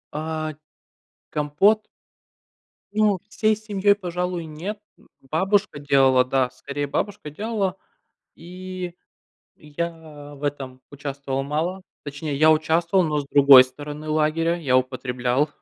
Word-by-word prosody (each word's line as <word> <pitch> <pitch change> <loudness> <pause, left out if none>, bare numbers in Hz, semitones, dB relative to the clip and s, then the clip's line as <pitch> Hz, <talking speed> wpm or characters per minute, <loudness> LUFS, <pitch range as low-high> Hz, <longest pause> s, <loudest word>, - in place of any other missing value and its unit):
А, 155 0 -3 0.8
компот? 180 +9 +2 1.1
Ну, 210 -3 +3
всей 215 0 +1
семьей, 205 -2 +1
пожалуй, 180 -2 -3
нет. 165 +8 -6 0.5
Бабушка 195 0 +1
делала, 135 -3 +4
да. 130 -1 0
Скорее, 140 +2 -5
бабушка 170 +1 -3
делала. 205 0 -2 0.6
И 180 0 -7 0.6
я 150 -2 -7
в 140 - -15
этом 135 -3 -4
участвовал 140 -1 -4
мало. 165 +6 -2 0.2
Точнее, 145 +1 -5
я 155 +2 +6
участвовал, 165 +4 +2
но, 150 -2 0
с 140 - -8
другой 140 -2 +9
стороны 145 +4 -8
лагеря, 155 +2 +1
я 135 -6 +2
употреблял. 130 +2 0
155 Hz, 110 wpm, -23 LUFS, 140-180 Hz, 1.1 s, другой